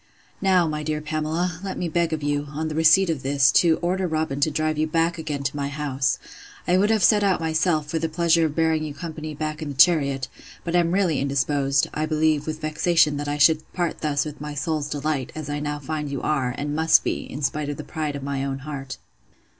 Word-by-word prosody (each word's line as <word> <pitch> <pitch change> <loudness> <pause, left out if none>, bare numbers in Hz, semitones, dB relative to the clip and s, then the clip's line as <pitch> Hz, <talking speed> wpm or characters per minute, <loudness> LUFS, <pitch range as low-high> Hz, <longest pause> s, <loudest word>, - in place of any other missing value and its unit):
'Now, 185 -3 +3
my 150 -1 -3
dear 150 0 -2
Pamela, 155 +3 -2
let 195 - -4
me 175 - -2
beg 170 0 0
of 155 -2 -3
you, 145 0 -1
on 155 +2 -3
the - - -4
receipt 160 +3 +5
of 150 -5 -3
this, 135 0 +3
to 165 -2 +4
order 185 +1 0
Robin 155 -4 -2
to 145 - +3
drive 155 0 -1
you 155 - +1
back 165 +2 0
again 150 -3 -4
to 135 +1 -2
my 140 -1 -2
house. 140 -3 -1 0.5
I 180 - +3
would 205 +2 +3
have 220 -3 +2
set 210 +2 +5
out 195 -2 +2
myself, 160 -1 +1
for 160 +2 -2
the 165 0 -2
pleasure 170 0 +3
of 150 - -7
bearing 160 -1 +1
you 150 -2 -5
company 155 -2 -6
back 155 +1 -4
in 155 - -4
the 140 - -6
chariot; 140 -4 +3 0.4
but 170 0 -2
am 170 -1 +3
really 180 -6 +1
indisposed; 140 0 +1
I 155 +1 -1
believe, 155 -1 +1
with 155 0 -4
vexation 155 -1 +2
that 145 0 -4
I 145 0 -1
should 155 +1 +3
part 175 -2 -2
thus 150 -1 0
with 150 -1 -8
my 150 0 -6
soul's 150 0 -2
delight, 145 -3 -2
as 155 -2 -5
I 145 - -2
now 150 0 -3
find 150 +1 -4
you 140 -2 -4
are, 130 -5 0
and 145 0 -3
must 160 +1 +4
be, - - -3
in 145 +3 -6
spite 145 +1 -1
of 145 - -4
the - - -6
pride 155 -3 -4
of 140 - -6
my 140 -1 -2
own 135 -1 -2
heart. 135 -3 -6
155 Hz, 235 wpm, -23 LUFS, 145-160 Hz, 0.5 s, receipt